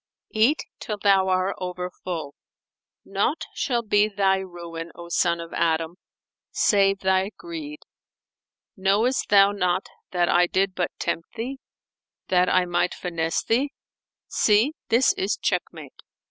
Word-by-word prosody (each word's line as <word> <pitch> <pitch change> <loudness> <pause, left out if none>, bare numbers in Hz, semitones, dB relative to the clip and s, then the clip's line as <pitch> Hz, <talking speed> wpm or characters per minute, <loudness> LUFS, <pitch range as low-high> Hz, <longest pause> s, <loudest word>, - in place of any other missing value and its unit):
[FN#451] 215 - -1
Eat 280 +8 +4 0.2
till 210 - -4
thou 195 -2 +3
are 185 +1 +1
over 180 0 -4
full; 160 -6 -4 0.7
naught - - -1
shall 240 -3 -1
be 210 -1 +3
thy 195 -2 +2
ruin, 170 -3 -7
O 170 0 -10
son 170 0 +1
of 165 0 -8
Adam, 165 +1 0 0.5
save 195 -1 +2
thy 190 +1 +2
greed. 310 -3 -7 0.9
Knowest 205 +7 +1
thou 200 0 +6
not 185 -2 0 0.2
that 175 -1 +1
I 175 0 +4
did 190 +1 +1
but 180 -1 -1
tempt 165 - -3
thee, 255 +4 -5 0.7
that 180 0 +3
I 185 0 +3
might 175 0 0
finesse 165 -2 -2
thee? 270 +6 0 0.5
See: 220 +8 +3 0.2
this 240 +3 +4
is 195 +2 -1
check 180 -2 +1
mate!" 155 -5 -12
190 Hz, 140 wpm, -24 LUFS, 175-210 Hz, 0.9 s, thou